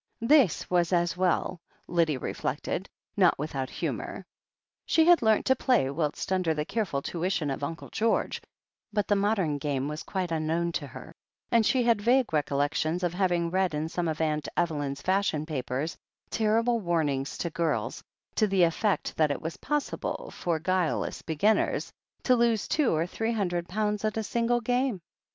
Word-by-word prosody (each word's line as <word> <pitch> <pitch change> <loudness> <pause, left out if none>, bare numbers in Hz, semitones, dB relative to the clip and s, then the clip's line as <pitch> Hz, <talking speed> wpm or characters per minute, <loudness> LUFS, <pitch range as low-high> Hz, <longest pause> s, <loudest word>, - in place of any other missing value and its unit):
This 255 - +4
was 175 -1 +2
as 175 -1 +2
well, 180 -1 0 0.3
Lydia 165 -5 +1
reflected, 145 +8 -3 0.3
not 185 -4 +4
without 135 -3 -3
humour. - - -4 0.6
She 320 - +4
had 350 0 +6
learnt 220 -2 +3
to 260 - +4
play 240 - +2
whist 150 +4 -2
under 180 -4 +1
the 150 0 -2
care 220 +5 -1
ful 140 -6 -3
tuition 175 -3 -1
of 135 - -4
Uncle 160 +3 -5
Greorge, 225 +1 0 0.5
but 210 -2 0
the 205 - +3
modem 195 -7 +1
game 140 -1 -1
was 150 +1 -4
quite 185 -3 -3
imknown 165 +2 0
to 145 - -3
her, 130 +4 -11 0.4
and 230 -1 +5
she 250 +3 +2
had 230 -3 +3
vague 245 -1 +3
recollections 150 +4 0
of 175 -1 0
having 175 -3 +1
read 185 -3 +1
in 155 +1 -1
some 175 0 -2
of 155 -1 -1
Atmt 155 -2 -1
Evelyn's 145 -5 -1
fashion 185 -5 +1
papers 140 +1 -3 0.4
terrible 230 +2 +2
warnings 155 -7 -1
to 170 - -3
girls, 165 0 -1 0.3
to 215 - +2
the 190 -2 +3
effect 185 +5 +1
that 155 -2 +3
it 145 - -1
was 160 +1 -4
possible 295 0 -3
for 170 -2 -1
guileless 180 0 -1
beginners 185 +7 +1 0.3
to 255 - +4
lose 235 -3 +2
two 300 -5 +2
or 160 +1 +1
three 225 +6 -2
hundred 175 -5 -1
pounds 210 +1 -1
at 215 0 -1
a 220 - 0
single 235 +2 +1
game. 245 -2 0
175 Hz, 170 wpm, -28 LUFS, 155-215 Hz, 0.6 s, had